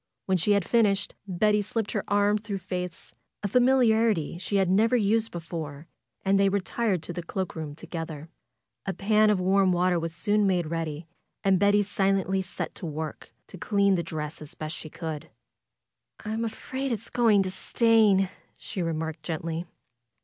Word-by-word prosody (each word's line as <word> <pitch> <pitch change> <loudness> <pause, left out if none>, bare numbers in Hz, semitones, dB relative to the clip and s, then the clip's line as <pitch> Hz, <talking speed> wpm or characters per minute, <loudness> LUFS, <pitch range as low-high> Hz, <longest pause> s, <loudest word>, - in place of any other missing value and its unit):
When 190 -1 +2
she 205 +6 +3
had 200 -3 +2
finished 205 -4 +2
Betty 210 +3 +2
slipped 215 +1 -2
her 210 - -1
arm 205 +1 +3
through 205 -2 -4
Faith's, 180 -2 -6 0.3
a - - +1
familiarity 225 - +3
she 190 +2 -3
had 195 -2 +3
never 215 +6 +3
used 225 0 +2
before, 165 -3 -6 0.4
and 195 +1 +4
they 195 0 +4
retired 200 -1 0
to 175 - -5
the 175 - -4
cloak 185 +2 -4
room 155 -3 -5
together. 165 -2 -6 0.6
A 195 - 0
pan 215 +2 +3
of 205 -3 +3
warm 190 +1 +3
water 180 0 +2
was 165 0 -3
soon 210 -1 +2
made 180 -3 +1
ready 165 -1 -3 0.4
and 195 -2 +4
Betty 205 +1 +4
silently 195 -1 +1
set 185 - -5
to 175 - -6
work 155 0 -6
to - - -12
clean 200 -2 +2
the 180 - +1
dress 155 -1 -5
as 155 +3 -10
best 155 +1 -5
she 155 - -8
could. 160 -2 -6 1.0
"I'm 220 +2 -2
afraid 260 +4 -4
it's 230 0 -4
going 225 -5 +4
to 185 - -3
stain," 215 -2 +3 0.3
she 195 - -5
remarked, 160 -1 -3
gently. 165 +1 -4
190 Hz, 170 wpm, -27 LUFS, 165-210 Hz, 1.0 s, and